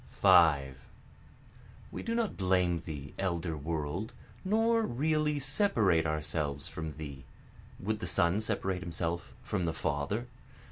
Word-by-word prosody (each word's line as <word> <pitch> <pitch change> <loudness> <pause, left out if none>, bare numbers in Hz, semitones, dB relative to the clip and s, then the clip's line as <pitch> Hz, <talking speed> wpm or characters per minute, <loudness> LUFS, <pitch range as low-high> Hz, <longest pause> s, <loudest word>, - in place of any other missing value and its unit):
5 70 -6 +5 1.1
We - - -5
do 230 - -2
not 230 -3 0
blame 90 -2 +2
thee 70 -3 -7
elder 85 -3 -1
World, 80 - -3 0.3
nor 225 +4 +3
really 150 - +1
separate 120 - +3
ourselves 75 -2 -2
from 80 -1 -5
thee, 70 -3 -7 0.6
(Would 105 +2 -2
the - - -4
son 85 +5 +2
separate 95 -4 -1
himself 85 -1 -3
from 95 -4 -1
the 80 - 0
father?) 80 +9 -2
85 Hz, 125 wpm, -31 LUFS, 80-115 Hz, 1.1 s, 5